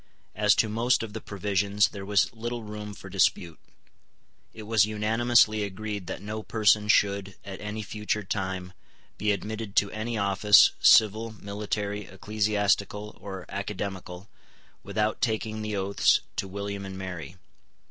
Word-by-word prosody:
As 105 -1 +3
to 115 - +2
most 115 +3 +1
of 110 -2 -7
the 110 - -6
provisions 100 0 +1
there 100 - -8
was 100 -2 +2
little 120 +1 -5
room 105 -1 -7
for 95 0 -11
dispute. 90 -3 +1 0.9
It 110 - -10
was 110 -1 +3
unanimously 110 +1 +3
agreed 100 -1 -5
that - - -6
no 110 +1 -4
person 105 -1 +2
should, 100 -2 +2
at 95 -1 -8
any 105 +1 -4
future 105 0 -3
time, 95 -2 -3 0.5
be 105 - +2
admitted 105 +1 -4
to 100 - +3
any 110 +2 -3
office, 100 0 +6
civil, 110 +1 +5
military, 105 0 -4
ecclesiastical, 105 +1 -1
or 95 -3 -7
academical, 95 -2 -5 0.5
without 105 0 -1
taking 110 -2 -1
the 110 -1 -3
oaths 100 0 +2 0.2
to 95 - -2
William 100 +1 -5
and 95 -1 -7
Mary. 90 -3 -7
105 Hz, 140 wpm, -27 LUFS, 100-110 Hz, 0.9 s, office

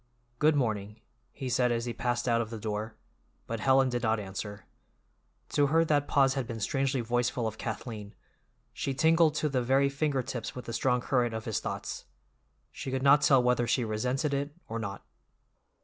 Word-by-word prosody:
"Good 155 0 +4
morning," 110 -5 -1 0.3
he 135 - -6
said 125 0 +2
as 115 0 -1
he 120 - -3
passed 120 +1 -1
out 115 -1 +3
of 110 - -4
the 115 - -6
door, 110 +1 -4 0.5
but 115 -1 -4
Helen 135 +3 +4
did 120 -1 -1
not 110 -1 +1
answer. 100 +1 -6 0.8
To 145 -1 +3
her 165 +3 +3
that 145 -2 +1
pause 135 -1 +4
had 135 -4 -2
been 115 -2 -5
strangely 135 +4 0
voiceful 120 +1 0
of 110 0 -6
Kathleen; 110 -2 -6 0.6
she 135 - -3
tingled 160 +1 +4
to 150 - +1
the 135 -3 0
very 135 +3 +3
finger 140 -1 0
tips 120 -3 -5
with 125 - -7
the 115 - -5
strong 125 +1 +1
current 120 -3 +1
of 110 - -5
his 110 -5 -1
thoughts. - - -5 0.7
She - - -6
could 130 0 -2
not 140 +1 +6
tell 135 -3 +5
whether 125 -1 +2
she 125 -1 +1
resented 125 +7 -1
it 140 +2 -2
or 115 +1 -4
not. 100 -2 -6
125 Hz, 190 wpm, -29 LUFS, 115-135 Hz, 0.8 s, not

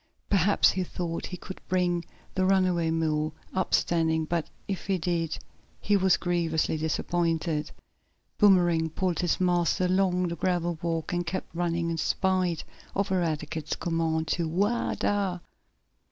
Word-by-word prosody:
Perhaps 200 0 +4
he 185 - -1
thought 170 -1 -4
he 180 - -6
could 190 +2 -9
bring 175 -2 +1 0.3
the 190 - +1
runaway 185 -3 +3
mule 155 -1 0 0.2
up 185 -1 -1
standing, 160 -2 +1
but, 170 0 -2 0.2
if 195 -2 -4
he 195 -1 +2
did, 165 -2 -1 0.4
he 205 - +2
was 190 -2 +4
grievously 170 -3 0
disappointed. 160 0 -1 0.7
Boomerang 175 -5 +4
pulled 180 +2 -1
his 175 -2 +1
master 180 0 +2
along 180 -1 +2
the 170 - -3
gravel 175 -1 -1
walk, 165 -1 -2
and 175 0 -1
kept 185 - -4
running 170 -1 -1
in 165 - -2
spite 185 0 +1 0.3
of 200 0 0
Eradicate's 160 -3 -1
command 165 -2 -1
to 170 0 0
"whoa, 200 +8 0
dar!" 195 -3 0
175 Hz, 140 wpm, -28 LUFS, 165-185 Hz, 0.7 s, Perhaps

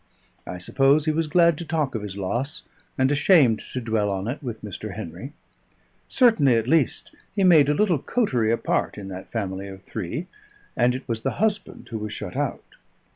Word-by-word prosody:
I 90 - -5
suppose 135 - +2
he 155 - +2
was 160 +1 -1
glad 170 0 +4
to - - -4
talk 155 -4 -1
of 110 - -3
his 100 -2 -7
loss, 120 +10 -2 0.3
and 130 0 +2
ashamed 145 - +4
to 130 - -2
dwell 110 -3 0
on 95 +1 -3
it 125 +5 -4
with 120 -5 -6
Mr. 105 0 -6
Henry. 110 - -7 0.8
Certainly, 190 - +4
at 115 0 0
least, 155 -1 +1 0.2
he 200 - +1
made 160 -6 +6
a 150 - +2
little 185 -6 +2
coterie 125 - 0
apart 115 - -1
in 100 -2 -7
that 95 0 -8
family 100 -3 -3
of 95 -1 -10
three, 110 - -5 0.5
and 125 +1 +2
it 130 - -7
was 115 -3 -2
the - - -1
husband 210 0 -2
who 115 -3 -4
was 105 0 -5
shut - - -7
out. - - -2
125 Hz, 190 wpm, -24 LUFS, 105-155 Hz, 0.8 s, made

